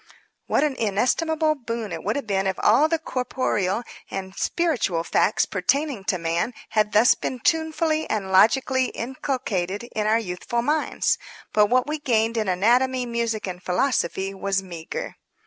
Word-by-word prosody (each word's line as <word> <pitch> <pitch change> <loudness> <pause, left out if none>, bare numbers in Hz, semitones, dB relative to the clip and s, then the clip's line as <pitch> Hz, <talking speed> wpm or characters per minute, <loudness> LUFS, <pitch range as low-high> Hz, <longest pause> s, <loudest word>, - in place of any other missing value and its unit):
What - - +2
an 295 -3 0
inestimable 310 - +1
boon 230 -6 -5
it - - -5
would - - -1
have 285 - -3
been 195 -2 0
if 190 - 0
all 255 +9 +5
the 330 - +2
corporeal 245 - -1 0.3
and 190 -1 -5
spiritual 245 - 0
facts 205 - +2
pertaining 245 - -1
to 185 - +1
man 170 +7 -1
had 210 -1 +1
thus 220 +4 +6
been 255 - -4
tunefully 320 +2 0
and 195 -3 -2
logically 255 +7 +4
inculcated 230 -7 -3
in 215 -1 0
our 220 +1 +4
youthful 225 +3 -3
minds! 300 +4 +1 0.3
But 210 -1 +5
what 250 +3 +2
we 300 +1 -3
gained 230 -4 +1
in 220 -2 0
anatomy, 245 +7 +2
music 235 -2 -2
and 180 -2 -6
philosophy 190 -2 0
was 195 0 -1
meagre. 170 -3 -6
225 Hz, 155 wpm, -24 LUFS, 195-265 Hz, 0.3 s, thus